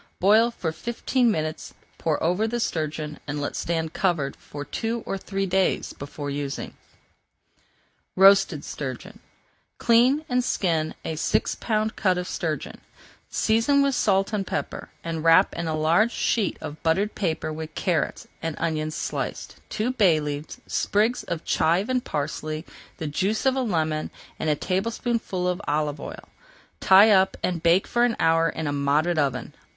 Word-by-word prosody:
Boil 215 +5 +5
for 175 -8 -3
fifteen 235 +7 0
minutes, 155 -5 -3 0.2
pour 155 -3 0
over 180 +7 +1
the 240 +2 -2
sturgeon, 155 -6 -3
and 145 0 -3
let 145 - -3
stand 160 -1 -2
covered 160 -8 0
for 145 0 -8
two 225 - -3
or - - -2
three 195 0 -3
days 190 0 0
before 145 0 -6
using. 140 -1 -4
[Page - - -28 1.4
410] 190 - +2
ROASTED 195 -6 +6
STURGEON 150 - -6 0.6
Clean 250 +6 +4
and 250 0 +1
skin 165 -9 0
a 160 - -2
six 155 - 0
pound 215 -1 -1
cut 185 -2 +1
of 180 0 -3
sturgeon, 160 -5 -4 0.5
season 235 +6 +3
with 280 -1 +2
salt 195 -3 +2
and 200 -2 -1
pepper, - - -4
and 165 -1 -3
wrap 165 +4 +5
in 170 0 -3
a 160 - -1
large 170 +9 +3
sheet 220 -4 0
of 150 +1 -7
buttered 195 +6 +1
paper 160 -5 -2
with 155 0 -7
carrots 175 -4 -1
and 165 -2 -3
onions 155 -2 -2
sliced, - - -4
two 230 +3 -1
bay 195 -11 +4
leaves, 150 0 -5
sprigs 220 +4 +1
of 170 -1 -4
chive 175 +8 +2
and 255 -1 +1
parsley, 155 +2 -3 0.3
the 160 - -5
juice 195 - -1
of 265 0 +3
a 265 - 0
lemon, 160 -9 -1 0.3
and 155 - -1
a 150 - +3
tablespoonful 195 - -1
of 180 +2 -1
olive 150 0 0
oil. - - -8 0.5
Tie 200 +3 +7
up 190 -1 +4
and 175 -3 -1
bake 170 +3 +4
for 240 0 +1
an 240 -2 +2
hour 165 0 +3
in 160 - -4
a 145 - -1
moderate 150 +4 +1
oven. 130 -4 -1
175 Hz, 165 wpm, -25 LUFS, 155-215 Hz, 1.4 s, Tie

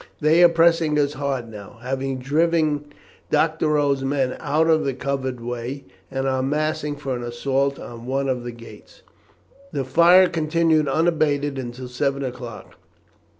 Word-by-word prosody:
"They 160 +3 +4
are 175 - +8
pressing 165 -2 +3
us 145 -1 +1
hard 135 -4 -3
now, 105 +1 -11
having 135 +1 -2
driven 150 +2 +1 0.4
Doctorow's 150 -4 +1
men 135 -1 0
out 155 +3 +1
of 160 -1 +3
the 135 -3 -2
covered 130 -1 -3
way, 120 +3 -5 0.3
and 135 0 -2
are 130 -1 0
massing 150 +1 -1
for 135 -3 -4
an 120 - -5
assault 135 +3 -1
on 120 0 -9
one 135 +1 -1
of 125 -2 -1
the 120 - -5
gates." 115 0 -14 0.7
The 140 - -2
fire 170 +7 +6
continued 160 -2 +1
unabated 145 -2 +1
until 125 0 -6
seven 140 +2 -1
o'clock. 120 -3 -8
140 Hz, 150 wpm, -22 LUFS, 130-155 Hz, 0.7 s, are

